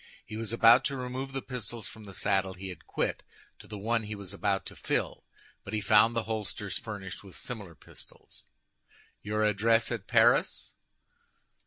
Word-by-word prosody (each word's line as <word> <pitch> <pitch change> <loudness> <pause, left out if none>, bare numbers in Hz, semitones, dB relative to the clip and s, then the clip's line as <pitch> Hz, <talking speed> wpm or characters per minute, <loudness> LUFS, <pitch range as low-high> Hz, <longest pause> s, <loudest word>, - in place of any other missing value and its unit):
He 110 - -8
was 115 -1 -3
about 115 0 +7
to 140 - -1
remove 130 +2 -4
the 135 -1 -4
pistols 120 -3 -5
from 110 0 -11
the 100 - -10
saddle 95 +1 +1
he 95 0 -7
had 90 - -10
quit - - -1 0.4
to - - -13
the 105 - -7
one 115 +3 +1
he 105 0 -5
was 100 -2 -7
about 100 -1 0
to - - -8
fill, - - -1 0.4
but 105 - -4
he - - +1
found 105 +3 +5
the 115 - +1
holsters 105 -2 -3
furnished 100 -4 -7
with 95 -2 -13
similar 100 -8 -6
pistols. - - -13 0.8
"Your 105 +1 0
address 115 +3 +3
at 115 -5 -4
Paris?" - - +3
110 Hz, 175 wpm, -30 LUFS, 100-115 Hz, 0.8 s, about